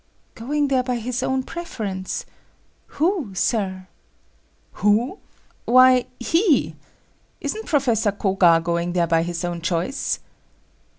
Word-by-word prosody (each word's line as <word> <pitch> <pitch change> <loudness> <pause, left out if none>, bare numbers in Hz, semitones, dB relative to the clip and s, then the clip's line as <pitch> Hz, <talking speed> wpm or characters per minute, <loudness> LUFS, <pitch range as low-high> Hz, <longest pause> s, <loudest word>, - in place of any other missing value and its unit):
"Going 285 +5 -1
there 260 -2 +3
by 250 0 -2
his 240 +2 -3
own 265 0 0
preference? 210 - -5 0.7
Who, 315 - 0
Sir?" 190 -2 -1 1.0
"Who? 225 - +2 0.5
Why, 255 0 +6
he! 330 - +2 0.7
Isn't 440 +1 -4
Professor 235 -8 +2
Koga 190 -4 +3
going 170 0 -1
there 175 -1 +2
by 165 0 +2
his 170 0 -3
own 175 -1 -4
choice?" 175 +10 -1
225 Hz, 110 wpm, -22 LUFS, 185-265 Hz, 1.0 s, Why